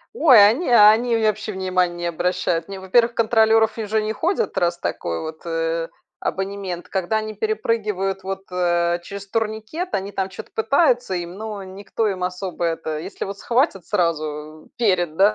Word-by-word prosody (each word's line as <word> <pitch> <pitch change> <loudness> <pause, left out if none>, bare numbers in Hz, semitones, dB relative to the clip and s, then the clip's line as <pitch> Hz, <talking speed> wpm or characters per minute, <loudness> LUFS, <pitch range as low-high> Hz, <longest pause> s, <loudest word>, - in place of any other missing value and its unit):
Ой, 250 - +8
они 255 +11 0
они 230 +1 +6
вообще 215 -1 0
внимания 185 -2 0
не 175 0 -5
обращают. 175 0 -1
Они, 195 0 -7
во-первых, 230 +5 +2
контролеров 220 0 +3
уже 215 0 0
не 215 +1 -2
ходят, 380 - -1
раз 175 0 +1
такой 85 - -3
вот, 160 0 -7
э, 165 0 -1 0.3
абонемент, 195 -2 -4
когда 190 +3 -1
они 215 0 -4
перепрыгивают 210 -3 -1
вот, 195 0 -4
э, 175 -1 +1
через 200 +2 -8
турникет, 220 - -3
они 195 +1 -3
там 195 -1 -2
что-то 215 +3 -10
пытаются 245 - +2
им, 175 0 -4
но 210 -1 -6
никто 195 +3 -3
им 190 -3 -2
особо 180 0 -4
это, 160 -2 -2
если 185 +5 -6
вот 200 +1 -7
схватят 235 - 0
сразу 155 -4 -2
перед, 180 -8 +1
да, 200 +2 +5
195 Hz, 160 wpm, -22 LUFS, 175-220 Hz, 0.3 s, Ой